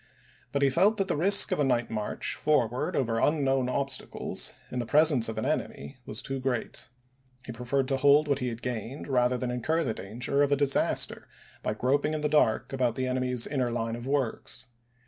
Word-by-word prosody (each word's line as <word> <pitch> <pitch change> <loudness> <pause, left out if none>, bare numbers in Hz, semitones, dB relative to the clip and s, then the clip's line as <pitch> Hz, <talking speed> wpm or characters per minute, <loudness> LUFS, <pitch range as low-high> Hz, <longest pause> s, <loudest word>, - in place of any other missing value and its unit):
But 140 0 0
he 135 - +3
felt 200 +9 +3
that 195 -2 0
the 175 - 0
risk 195 +7 +6
of - - 0
a - - +3
night 120 -4 0
march 105 -1 -2
forward 125 -5 0
over 115 -3 0
un 150 -1 +2
known 135 -1 +1
obstacles, 135 0 -1 0.2
in 125 - -3
the 120 - -2
presence 145 -6 +4
of 110 - -6
an 110 - -2
enemy, 145 -2 -4
was 105 - -4
too 135 0 -3
great; 130 -2 -3 0.6
he - - -6
preferred 125 +3 -2
to 135 - +1
hold 145 +2 +4
what 140 -1 0
he 125 - -2
had 115 0 -6
gained 125 +2 -5
rather 125 -2 +1
than 125 0 -3
incur 155 +7 -1
the 115 - -2
danger 120 +8 -2
of 145 0 +2
a - - +5
disaster 140 -1 0 0.3
by 105 - -2
groping 145 +6 0
in 155 - -3
the 150 - 0
dark 140 -6 +1
about 125 -3 0
the 130 - -2
enemy's 125 -1 0
inner 130 -4 -1
line 115 -1 -3
of 120 +2 -8
works. 130 -2 -2
130 Hz, 205 wpm, -28 LUFS, 120-145 Hz, 0.6 s, risk